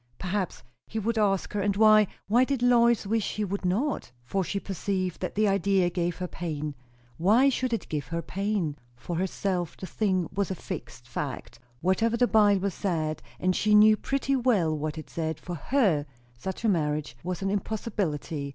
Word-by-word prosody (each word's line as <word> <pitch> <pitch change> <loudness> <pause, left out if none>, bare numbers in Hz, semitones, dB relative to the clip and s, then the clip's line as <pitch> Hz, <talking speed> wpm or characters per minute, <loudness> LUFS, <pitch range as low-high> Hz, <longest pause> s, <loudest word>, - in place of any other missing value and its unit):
Perhaps 185 0 -3 0.2
he 225 - -6
would 225 +1 0
ask 195 -2 +1
her; 205 - 0
and 200 0 +1
why, 215 -1 +6 0.2
why 235 +5 +5
did 260 -2 -1
Lois 235 -2 +4
wish 220 +1 -1
he 215 - -1
would 200 +1 -3
not? 200 - -1
For 190 +10 -1
she 200 +3 -2
perceived 190 -2 -3
that 180 - -3
the 215 +1 +3
idea 195 -2 +2
gave 175 -1 -1
her 180 - -3
pain. 155 -4 -4 0.4
Why 220 +10 +5
should 255 -1 -1
it 230 - -2
give 145 -4 -3
her 170 +4 -3
pain? 195 -5 -2 0.2
For 170 +8 -5
herself, 180 -1 -2
the - - -6
thing 185 -3 0
was 200 0 0
a 190 - -2
fixed 120 -6 -8
fact; 120 -1 -5 0.2
whatever 225 +6 +2
the 245 - +4
Bible 205 -4 +3
said 160 -5 -2 0.2
and 185 0 +1
she 210 0 +3
knew 215 +1 +8
pretty 275 +4 -1
well 215 -12 +2
what 155 +1 -3
it 155 - -7
said 160 -2 -3
for 175 - -6
her, 175 - +1 0.3
such 190 - -5
a - - +4
marriage 150 - 0
was 180 +1 -3
an 195 - 0
impossibility. 185 -8 -2
195 Hz, 185 wpm, -27 LUFS, 165-215 Hz, 0.4 s, knew